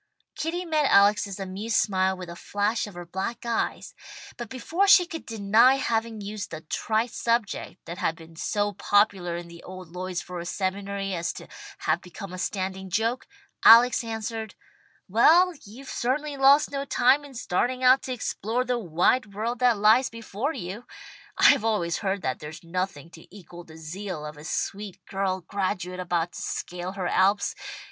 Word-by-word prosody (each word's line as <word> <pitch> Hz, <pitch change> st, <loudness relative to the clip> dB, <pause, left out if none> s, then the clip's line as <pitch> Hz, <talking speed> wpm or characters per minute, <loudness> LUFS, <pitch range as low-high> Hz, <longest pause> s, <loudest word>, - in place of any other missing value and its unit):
Kitty 345 Hz, +3 st, -3 dB
met 310 Hz, -4 st, +2 dB
Alex's 200 Hz, 0 st, +4 dB
amused 195 Hz, +4 st, -3 dB
smile 190 Hz, -2 st, +1 dB
with 180 Hz, -1 st, -7 dB
a 170 Hz, -, -8 dB
flash 205 Hz, +5 st, -1 dB
of 205 Hz, -, -11 dB
her 175 Hz, 0 st, -7 dB
black 190 Hz, +8 st, -4 dB
eyes, 235 Hz, -1 st, -2 dB, 0.4 s
but 240 Hz, -3 st, -7 dB
before 330 Hz, +10 st, 0 dB
she 390 Hz, -3 st, +7 dB
could 330 Hz, -2 st, -8 dB
deny 225 Hz, +4 st, +4 dB
having 225 Hz, -4 st, -1 dB
used 205 Hz, 0 st, -5 dB
the 155 Hz, -1 st, -7 dB
trite 220 Hz, +8 st, -1 dB
subject 230 Hz, -5 st, -1 dB
that 170 Hz, +2 st, -7 dB
had 165 Hz, -, 0 dB
been 165 Hz, -1 st, -14 dB
so 205 Hz, +5 st, -1 dB
popular 200 Hz, -5 st, +2 dB
in 170 Hz, 0 st, -6 dB
the 170 Hz, 0 st, -12 dB
old 185 Hz, -2 st, -10 dB
Lloydsboro 180 Hz, -1 st, -5 dB
seminary 195 Hz, +1 st, -3 dB
as 170 Hz, -1 st, -2 dB
to -, -, -10 dB, 0.3 s
have 160 Hz, +3 st, 0 dB
become 185 Hz, +1 st, -9 dB
a 185 Hz, -, -6 dB
standing 190 Hz, 0 st, -3 dB
joke, 225 Hz, +6 st, -1 dB, 0.4 s
Alex 240 Hz, +2 st, +8 dB
answered, 225 Hz, -1 st, -5 dB, 0.5 s
"Well, 330 Hz, -, +5 dB
you've 240 Hz, +7 st, -12 dB
certainly 285 Hz, +4 st, -1 dB
lost 275 Hz, +2 st, +5 dB
no 275 Hz, -1 st, -2 dB
time 265 Hz, +1 st, +3 dB
in 280 Hz, -2 st, -12 dB
starting 250 Hz, +4 st, -1 dB
out 255 Hz, +1 st, +6 dB
to 260 Hz, -, -6 dB
explore 240 Hz, +1 st, -2 dB
the 250 Hz, -1 st, 0 dB
wide 200 Hz, +4 st, +1 dB
world 230 Hz, +3 st, -2 dB
that 245 Hz, -3 st, +4 dB
lies 220 Hz, +6 st, +5 dB
before 230 Hz, +4 st, -4 dB
you. 195 Hz, -, -7 dB, 0.5 s
I've -, -, +6 dB
always 205 Hz, -7 st, 0 dB
heard 195 Hz, -1 st, -2 dB
that 130 Hz, -1 st, -2 dB
there's 150 Hz, +3 st, -9 dB
nothing 170 Hz, -2 st, -4 dB
to 165 Hz, -, -14 dB
equal 175 Hz, -3 st, -12 dB
the 160 Hz, 0 st, -13 dB
zeal 165 Hz, 0 st, -6 dB
of 150 Hz, 0 st, -7 dB
a 150 Hz, +1 st, -12 dB
sweet 200 Hz, +2 st, -4 dB
girl 190 Hz, -1 st, -2 dB
graduate 185 Hz, -1 st, -3 dB
about 175 Hz, -1 st, -1 dB
to -, -, -8 dB
scale 180 Hz, +1 st, -4 dB
her 190 Hz, -2 st, -4 dB
Alps. 195 Hz, +3 st, +2 dB
200 Hz, 170 wpm, -26 LUFS, 180-235 Hz, 0.5 s, Alex